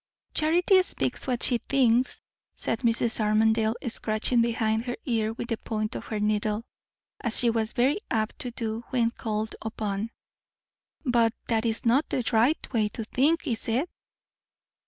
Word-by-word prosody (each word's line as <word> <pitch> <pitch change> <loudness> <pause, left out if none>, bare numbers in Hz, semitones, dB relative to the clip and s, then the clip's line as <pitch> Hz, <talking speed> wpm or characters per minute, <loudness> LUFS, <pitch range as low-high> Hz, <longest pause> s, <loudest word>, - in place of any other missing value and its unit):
"Charity 350 +5 +4
speaks 365 - -1
what 245 -2 0
she 245 -3 +3
thinks," 250 -2 +1 0.3
said 225 - -2
Mrs. 235 -1 +1
Armadale, 220 +1 +2
scratching 230 +1 +1
behind 225 -1 0
her 245 -1 -3
ear 225 -4 0
with 235 - -6
the 230 - -1
point 215 -1 -3
of - - -6
her 215 - -3
needle, 210 +1 0 0.5
as 235 -1 +1
she 240 -2 +6
was 225 -1 -1
very 270 +9 +2
apt 215 -1 -1
to 250 - -1
do 230 -1 -3
when 235 -3 +1
called 215 -1 -3
upon. 215 -1 -3 1.0
"But 235 -3 +3 0.2
that 225 0 +1
is 225 +1 -1
not 255 +6 +3
the 250 - -2
right 240 +8 +3
way 220 -3 +2
to 225 +2 -5
think, 295 +10 +1
is 235 -6 -2
it?" 255 +9 0
230 Hz, 155 wpm, -27 LUFS, 220-245 Hz, 1.0 s, she